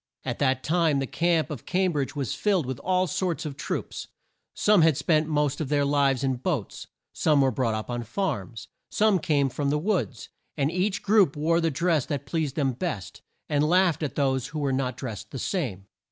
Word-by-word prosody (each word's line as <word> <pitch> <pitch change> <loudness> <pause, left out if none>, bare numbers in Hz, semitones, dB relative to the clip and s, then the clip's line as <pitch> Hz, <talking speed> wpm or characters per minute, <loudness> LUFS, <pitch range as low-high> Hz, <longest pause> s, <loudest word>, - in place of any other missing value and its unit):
At 125 -2 -3
that 130 -2 +1
time 165 -3 +2
the 135 - 0
camp 165 +2 +1
of 140 -7 -7
Cam 185 0 +1
bridge 145 -1 -2
was 135 -7 -2
filled 195 -7 +1
with 130 -1 -4
all 185 0 +1
sorts 185 -2 -2
of 145 -3 -5
troops. 150 - -4 0.5
Some 210 -3 +4
had 160 -4 +4
spent 155 +1 +2
the - - -5
most 150 -1 0
of 145 - -3
their 145 -1 +2
lives 140 -2 +2
in 130 -2 0
boats, 135 - -3 0.3
some 150 -3 +2
were 135 -1 +4
brought 115 -5 0
up 110 - -4
on 120 0 -2
farms, 120 - -3 0.2
some 210 -3 +3
came 145 -3 +2
from 140 +2 -2
the 150 - +1
woods, 165 - -2 0.3
and 140 +2 +1
each 190 +3 -1
group 205 -7 +4
wore 165 +3 +2
the 165 - +2
dress 160 -1 +1
that 140 -1 -3
pleased 155 -2 -2
them 140 -4 +1
best, 125 - -5 0.3
and 145 -1 +1
laughed 180 -3 +3
at 150 - -3
those 130 -3 0
who 155 - -7
were 140 -3 0
not 130 -2 -1
drest 115 -7 -6
the 135 - -7
same. 125 - -3
150 Hz, 210 wpm, -26 LUFS, 135-170 Hz, 0.5 s, Some